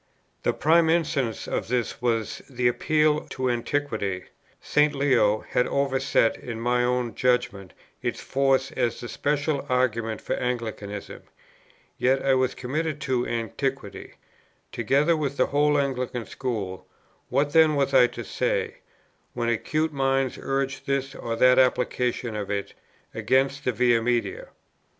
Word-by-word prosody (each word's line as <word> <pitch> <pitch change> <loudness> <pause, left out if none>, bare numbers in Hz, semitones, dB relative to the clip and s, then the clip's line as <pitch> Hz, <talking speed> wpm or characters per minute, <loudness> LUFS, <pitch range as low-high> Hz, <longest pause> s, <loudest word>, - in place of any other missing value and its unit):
The - - +1
prime 160 +2 +3
instance 150 -8 0
of - - -2
this 120 -1 -2
was 115 -3 -1
the 125 -2 0
appeal 150 +4 +2
to 130 -1 -1
Antiquity; 115 -7 -2 0.4
St. 150 0 +2
Leo 125 -7 +3
had 125 - +1
overset, 135 -4 +1
in 115 -2 -7
my 120 +1 +1
own 125 -2 0
judgment, 105 -7 0 0.3
its - - -2
force 135 0 +1
as 120 -2 -1
the 120 - -6
special 145 +2 -1
argument 115 -3 0
for - - -3
Anglicanism; 110 -5 -4 0.8
yet 130 +2 +2
I 135 - +4
was 130 0 +1
committed 150 +4 -3
to 130 -3 0
Antiquity, 120 0 -4 0.6
together 140 +8 +2
with 140 -3 -2
the - - +4
whole 145 +1 +2
Anglican 125 -4 -2
school; 105 -8 -4 0.4
what 145 +3 +1
then 160 -2 +5
was 140 -1 0
I 125 -2 +7
to - - -7
say, - - -1 0.6
when 120 -1 -1
acute 155 +7 -1
minds 135 -1 +1
urged 135 0 -2
this 135 0 -1
or 115 -1 -4
that 125 +2 +5
application 125 -2 +1
of 105 -2 -4
it 100 -1 -3 0.4
against 130 +5 +1
the 125 - +2
Via 120 -1 +3
Media? 120 0 -1
130 Hz, 140 wpm, -25 LUFS, 120-140 Hz, 0.8 s, I